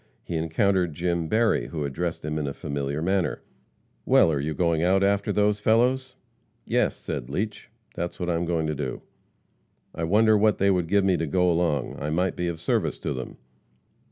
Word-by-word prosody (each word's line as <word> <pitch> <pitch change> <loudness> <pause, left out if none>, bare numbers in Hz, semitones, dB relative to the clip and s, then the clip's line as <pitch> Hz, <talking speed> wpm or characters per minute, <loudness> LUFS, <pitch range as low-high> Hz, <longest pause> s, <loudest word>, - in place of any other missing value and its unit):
He 85 - -5
encountered 85 +1 +1
Jim 85 0 -1
Berry, 110 +5 +2
who 75 -3 -4
addressed 80 +4 -3
him 75 0 -2
in 75 - -2
a 70 - -4
familiar 70 +1 -3
manner: 95 -4 0 0.6
"Well, 80 - +5
are 75 - 0
you 75 +2 -2
going 85 -3 +1
out 95 +3 +3
after 100 0 +1
those 105 0 +2
fellows?" 125 +5 +2 0.5
"Yes," - - +1
said - - -5
Leach, 105 +9 -4 0.2
"that's 85 +1 -5
what 90 - -2
I 85 - +1
am 85 +1 -1
going 85 -2 0
to 75 - -1
do." 70 -3 -4 0.9
"I 80 - -3
wonder 110 +5 +4
what 105 0 +3
they 100 0 +3
would 90 -3 0
give 100 +3 +3
me 95 -2 +3
to 80 0 -2
go 90 +4 +2
along? 80 -6 0
I 75 - -3
might 90 +4 0
be 90 - -2
of 85 -2 -4
service - - 0
to - - -3
them." 65 -1 -7
85 Hz, 195 wpm, -25 LUFS, 80-100 Hz, 0.9 s, Well